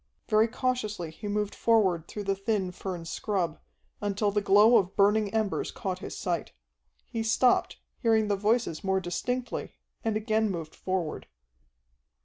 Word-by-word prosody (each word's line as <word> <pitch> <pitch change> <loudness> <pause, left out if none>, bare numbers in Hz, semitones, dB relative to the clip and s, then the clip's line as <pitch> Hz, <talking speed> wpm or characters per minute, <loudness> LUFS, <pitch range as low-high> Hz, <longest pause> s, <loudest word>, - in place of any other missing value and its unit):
Very 215 +1 +5
cautiously 215 -8 -2
he 205 +6 -8
moved 210 0 -1
forward 190 -8 +2
through 210 - -6
the 195 0 +1
thin 195 -1 -1
fern 180 -2 -6
scrub, 175 -2 -2 0.4
until 205 0 0
the 205 +1 +1
glow 205 +4 +6
of 185 -1 0
burning 205 +1 +3
embers 220 -2 0
caught 185 -2 -4
his - - -7
sight. 175 -3 -2 0.5
He 225 - -4
stopped, 225 +3 +2 0.2
hearing 220 -2 +3
the 205 - +2
voices 210 -4 0
more 190 0 +2
distinctly, 240 +8 -3 0.3
and 220 -2 +1
again 220 0 +1
moved 165 -4 -5
forward. 185 -4 -3
205 Hz, 145 wpm, -28 LUFS, 190-220 Hz, 0.5 s, glow